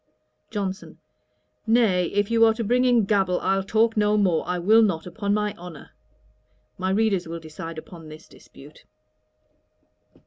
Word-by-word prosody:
JOHNSON. 200 -2 -5 0.7
'Nay, 220 -6 +3
if 205 +4 -1
you 230 0 +4
are 225 -1 +4
to 230 - -3
bring 245 +4 +1
in 240 -4 +3
gabble, 190 -3 +1
I'll 195 0 +1
talk 220 +3 +1
no 210 0 +2
more. 185 -6 +1
I 180 - -1
will 215 +6 +4
not, 190 -7 0
upon 200 +3 -4
my 210 0 0
honour.' 175 -3 -11 0.9
My 185 0 -1
readers 195 -3 0
will 165 +1 -6
decide 165 +1 -9
upon 165 0 -11
this 155 +1 -13
dispute. 145 +2 -17
195 Hz, 150 wpm, -24 LUFS, 175-220 Hz, 0.9 s, you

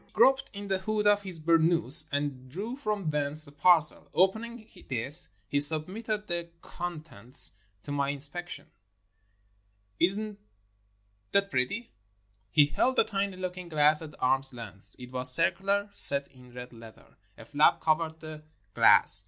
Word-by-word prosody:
He - - -32
groped 270 +1 +2
in 200 0 -10
the 190 -1 -2
hood 210 +2 -3
of 205 0 +2
his 185 -4 -8
burnous, 165 -2 +3
and 140 -3 -5
drew 205 - -7
from 210 - -4
thence 150 +1 -3
a 140 - -9
parcel. 155 +1 +3
Opening 220 +5 -2 0.2
this, 135 +6 -1 0.2
he 145 - -1
submitted 190 +9 +5
the 170 -2 -5
con 175 -3 -7
tents 125 -5 -1 0.3
to 145 - -9
my 140 -1 -2
inspection. 150 +5 -5 1.3
"Is 190 +4 +3
n't 215 -1 -8 0.9
that 200 0 0
pretty?" 130 - -3 0.3
— 100 -1 -41
He 145 - +7
held 255 - -2
a - - +4
tiny 200 -3 -4
looking 180 -1 -7
glass 150 0 +2
at 155 -2 -11
arm's 135 +1 -1
length. 105 -4 -13
It 125 -1 -13
was 130 0 +4
circular 200 +4 0
— - - -32
set 140 -5 +4
in 125 -2 -19
red 125 0 -11
leather; 115 -1 -17
— - - -41
a - - -14
flap 150 +1 +1
covered 160 0 -2
the 155 -1 -10 0.3
glass. - - +7
160 Hz, 160 wpm, -27 LUFS, 140-195 Hz, 1.3 s, He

